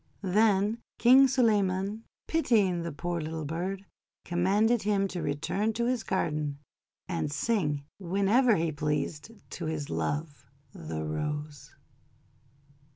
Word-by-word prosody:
Then 205 +2 +2 0.2
King 260 +3 +7
Suleyman, 210 -4 +1 0.2
pitying 210 - +2
the 170 0 -4
poor 170 +4 -3
little 155 0 -4
bird, 185 +6 -4 0.4
commanded 205 +6 +2
him 200 -1 +1
to 180 - -4
return 195 +9 -1
to 235 +2 -1
his 250 -1 0
garden, 150 -6 -1 0.5
and 165 -5 -2
sing 150 -6 0 0.2
whenever 200 +6 +3
he 165 -2 0
pleased 150 +3 -2 0.2
to 170 - -5
his 155 -2 -3
Love 145 - -3 0.3
the 80 0 -5
Rose. 150 - -4
180 Hz, 115 wpm, -29 LUFS, 150-210 Hz, 0.5 s, King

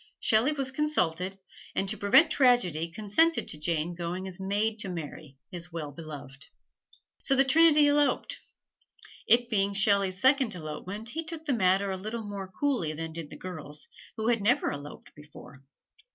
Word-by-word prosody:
Shelley 225 +6 +3
was 275 -3 -3
consulted, 195 - -1 0.4
and 195 - 0
to 210 - -1
prevent 205 +11 +5
tragedy 185 - +3
consented 215 - +1
to 150 - -6
Jane 165 +1 -1
going 175 +2 -4
as 185 -1 -9
maid 205 +3 -1
to 195 - -4
Mary, 155 -4 -7
his 175 0 -6
well 155 -3 -5
beloved. 140 -3 -9 0.7
So 270 - +3
the 270 - +5
trinity 305 +1 +5
eloped. 290 - +1 0.9
It 240 +1 +5
being 200 -3 0
Shelley's 195 -2 +2
second 260 -4 +3
elopement, 185 +7 -6
he 325 +6 -3
took 320 0 -7
the 285 - +1
matter 195 -2 +2
a 190 - -3
little 215 +4 -5
more 200 -2 -6
coolly 250 - 0
than 160 +1 -6
did 160 -2 -6
the - - -10
girls, 155 -5 -8 0.3
who 220 +1 0
had 235 -3 +2
never 245 +8 +2
eloped 145 0 -9
before. 145 -2 -14
195 Hz, 165 wpm, -28 LUFS, 165-245 Hz, 0.9 s, prevent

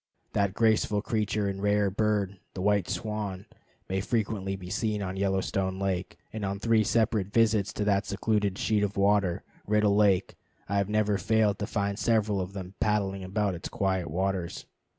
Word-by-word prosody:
That 100 -1 +1
graceful 110 -2 +2
creature 105 -2 0
and 95 0 -3
rare 105 -1 +2
bird, 100 -2 0 0.2
the 95 - -4
white 100 -3 +2
swan, 100 0 -3 0.4
may 95 +1 -1
frequently 100 -3 -1
be 90 -1 -8
seen 105 -3 -1
on 95 0 -4
Yellowstone 95 0 0
Lake, 95 -1 -2 0.2
and 110 -1 -4
on 100 0 -2
three 110 +1 +3
separate 110 -2 +1
visits 110 -2 +3
to 105 - -2
that 100 -1 +1
secluded 100 -1 0
sheet 105 -2 +1
of 100 -1 -1
water, 100 -3 +2 0.2
Riddle 105 -1 +3
Lake, 100 -3 +3 0.3
I 100 - 0
have 100 0 +1
never 105 -1 +1
failed 110 +1 +2
to 105 - -2
find 100 -1 -1
several 110 -4 +2
of 90 +1 -5
them 95 -1 -7
paddling 100 -2 0
about 100 +2 0
in 90 - -3
its 85 - -7
quiet 95 -6 -1
waters. 95 +1 -2
100 Hz, 175 wpm, -28 LUFS, 95-105 Hz, 0.4 s, three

